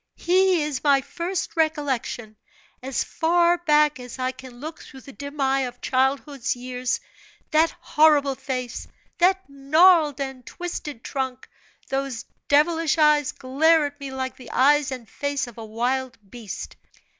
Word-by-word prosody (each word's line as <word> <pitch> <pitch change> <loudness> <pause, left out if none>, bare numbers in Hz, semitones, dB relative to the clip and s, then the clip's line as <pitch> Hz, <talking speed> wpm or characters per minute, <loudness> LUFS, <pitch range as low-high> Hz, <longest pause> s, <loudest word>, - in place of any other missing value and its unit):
He 365 -1 +3
is 295 -3 -3
my 280 -2 +5
first 350 +6 -4
recollection. 280 -8 -1 0.5
As 260 0 -1
far 345 +1 +2
back 300 -4 +3
as 250 0 -9
I 255 0 -1
can 255 -1 -13
look 310 +3 -7
through 265 -2 -13
the 275 - -13
dim 285 +2 -9
eye 270 0 +2
of 245 -2 -4
childhood's 265 0 0
years, 250 - -3 0.5
that 315 +2 +4
horrible 300 -3 +4
face, 255 -2 -5 0.3
that 380 +2 +3
gnarled 295 +2 +4
and 265 -2 -5
twisted 300 -8 -6
trunk, 260 -2 -4 0.4
those 270 -4 -3 0.2
devilish 320 +3 +3
eyes 300 -2 +4
glare 305 +4 +2
at 290 0 -7
me 280 -1 -6
like 260 0 -4
the 250 -4 -12
eyes 290 +1 +3
and 250 -3 -7
face 285 +1 -2
of 235 -2 -12
a - - -6
wild 250 +4 -2
beast. 215 -2 -8
275 Hz, 145 wpm, -24 LUFS, 255-310 Hz, 0.5 s, my